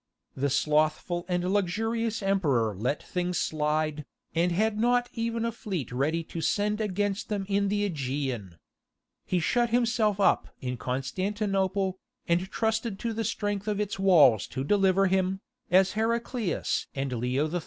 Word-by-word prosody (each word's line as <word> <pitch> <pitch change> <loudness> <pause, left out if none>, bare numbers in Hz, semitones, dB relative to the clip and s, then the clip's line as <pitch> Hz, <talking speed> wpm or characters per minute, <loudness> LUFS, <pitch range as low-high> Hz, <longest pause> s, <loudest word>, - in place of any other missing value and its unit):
The 140 +2 0
slothful 155 +5 +1
and 180 +1 0
luxurious 225 +3 0
emperor 140 - +1
let 125 +9 -2
things 180 -1 -2
slide, 155 0 0 0.3
and 170 +2 +2
had 210 +4 +1
not 245 +1 +2
even 230 0 -1
a 230 - 0
fleet 195 - -4
ready 150 +7 0
to 165 +1 -6
send 210 +6 0
against 205 0 -1
them 205 -2 -2
in 200 0 +1
the 205 +1 +1
Aegean. 130 - -3 0.7
He 180 - +1
shut 240 +8 +1
himself 225 -3 +2
up 200 - +3
in 125 -1 -3
Constantinople, 190 - -1 0.3
and 175 +2 +1
trusted 220 -1 -1
to 230 +2 -3
the 225 +1 -2
strength 205 -2 -2
of 210 -1 0
its 205 -2 -2
walls 150 - +5
to 130 - -4
deliver 195 +3 +3
him, 190 0 +1 0.3
as 185 +1 +5
Heraclius 230 - -1
and 135 -1 -2
Leo 125 +5 0
III. 175 +3 -2
190 Hz, 150 wpm, -28 LUFS, 155-210 Hz, 0.7 s, walls